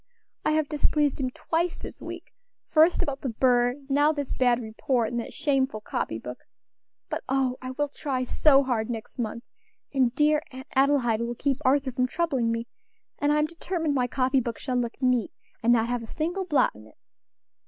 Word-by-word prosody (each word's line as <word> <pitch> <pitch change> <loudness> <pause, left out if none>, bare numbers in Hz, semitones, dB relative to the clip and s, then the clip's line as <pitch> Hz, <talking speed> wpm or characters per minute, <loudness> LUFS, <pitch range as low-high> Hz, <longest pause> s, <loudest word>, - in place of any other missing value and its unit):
I - - +2
have 310 -1 +1
displeased 295 -1 +1
him 260 -2 0
twice 330 +6 -1
this - - -9
week - - -8 0.4
first 325 +2 +4
about 280 -1 -4
the 265 - -2
bird, 245 +1 +3
and 280 -1 -20
now 290 +2 +4
this 285 -3 -3
bad 245 -2 +3
report, 230 +1 -1
and 240 - -2
that 235 - -5
shameful 270 -6 0
copy 110 - -3
book. 125 +2 -8 0.7
But - - -4
oh! 260 -1 +1
I 255 - -5
will 290 +3 -1
try 270 -2 -3
so 275 +2 +4
hard 240 -4 -1
next 230 +2 -6
month, 230 0 -3 0.5
and 260 -3 +3
dear 300 +1 +3
Aunt 260 0 -9
Adelaide 265 -5 +3
will 235 +1 -2
keep 270 +2 0
Arthur 265 0 +2
from 255 0 +1
troubling 265 -7 0
me, 230 0 -2 0.5
and 290 0 +2
I'm 300 0 +3
determined 330 -1 -2
my 250 -3 +1
copy 260 +1 +2
book 235 -2 -3
shall 255 -2 -2
look 240 -1 -2
neat, 250 -3 +2 0.3
and 235 - +3
not 230 -1 +3
have 245 0 -1
a 230 - -8
single 345 - -2
blot 300 -6 +3
in 110 +1 -14
it. - - -21
260 Hz, 195 wpm, -26 LUFS, 240-290 Hz, 0.7 s, first